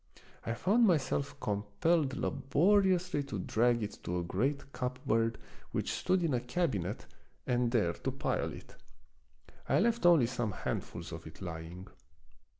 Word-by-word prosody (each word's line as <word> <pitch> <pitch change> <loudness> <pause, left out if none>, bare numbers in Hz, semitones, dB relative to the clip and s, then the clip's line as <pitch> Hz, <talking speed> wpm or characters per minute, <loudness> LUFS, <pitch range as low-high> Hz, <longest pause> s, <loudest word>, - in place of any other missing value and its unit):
I 115 - -1
found 220 - +4
myself 140 -4 0
compelled 125 +8 0
labori 180 +8 +3
ously 175 -4 -2
to 105 - -5
drag 120 +4 +2
it 105 - -6
to 90 - -2
a 90 - -1
great 135 +11 -2
cupboard 115 -3 0 0.4
which - - -1
stood 185 -1 +1
in 160 -4 +1
a 125 - +2
cabinet 120 - -2 0.4
and 125 -1 +1
there 105 -8 +2
to - - -3
pile - - -1
it. - - -11 0.9
I - - +4
left 230 -4 +3
only 165 -8 +6
some 120 -4 -2
handfuls 85 -2 -4
of 80 0 -7
it 80 - -12
lying. 85 +1 -7
125 Hz, 150 wpm, -32 LUFS, 100-160 Hz, 0.9 s, only